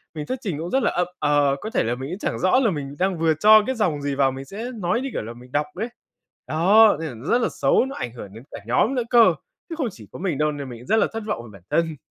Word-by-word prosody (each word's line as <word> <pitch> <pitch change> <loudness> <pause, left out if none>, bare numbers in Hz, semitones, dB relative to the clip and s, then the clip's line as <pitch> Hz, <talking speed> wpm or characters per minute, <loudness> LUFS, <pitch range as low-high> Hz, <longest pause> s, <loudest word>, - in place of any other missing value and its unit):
mình 150 -1 -4
thuyết 255 - -4
trình 185 - -3
cũng 165 +2 -4
rất 265 - +2
là - - +2
ậm 180 0 0
ờ, 145 -2 +2
có 220 - -4
thể - - +1
là 120 +2 -1
mình 130 +2 -6
cũng 180 +4 -5
chẳng - - -3
rõ 185 +8 +3
là 235 -6 +2
mình 145 -3 -5
đang 185 -1 +1
vừa 165 -1 +3
cho 215 +7 +6
cái 260 - -1
dòng 175 -10 0
gì 140 -1 -2
vào, 135 -1 +3
mình 135 +1 -7
sẽ 205 - -7
nói 190 +2 -1
như 270 - -3
kiểu - - -2
là 115 - -7
mình 125 +1 -15
đọc 145 +2 +1
ấy. 220 +6 -3 0.6
Đó, 200 +7 +5
nên 160 - -4
là 120 -5 -10
nó 140 - -9
rất 245 - +3
là - - +2
xấu, - - +2
nó 270 - -7
ảnh 120 -2 -5
hưởng 105 -5 -10
đến 115 +3 -11
cả - - -7
nhóm 215 - +2
nữa 250 - 0
cơ, 230 -7 +6 0.4
chứ 330 - -4
không 275 -7 -1
chỉ 110 - -14
có - - -9
mình 175 -6 -1
đâu, 150 0 +1
nên 140 -2 -6
mình 120 -2 -9
cũng 125 - -14
rất - - +3
là - - +3
thất 225 -1 -4
vọng 120 - -3
về 115 - -12
bản 100 - -14
thân. 165 -1 0
165 Hz, 315 wpm, -23 LUFS, 135-215 Hz, 0.6 s, cho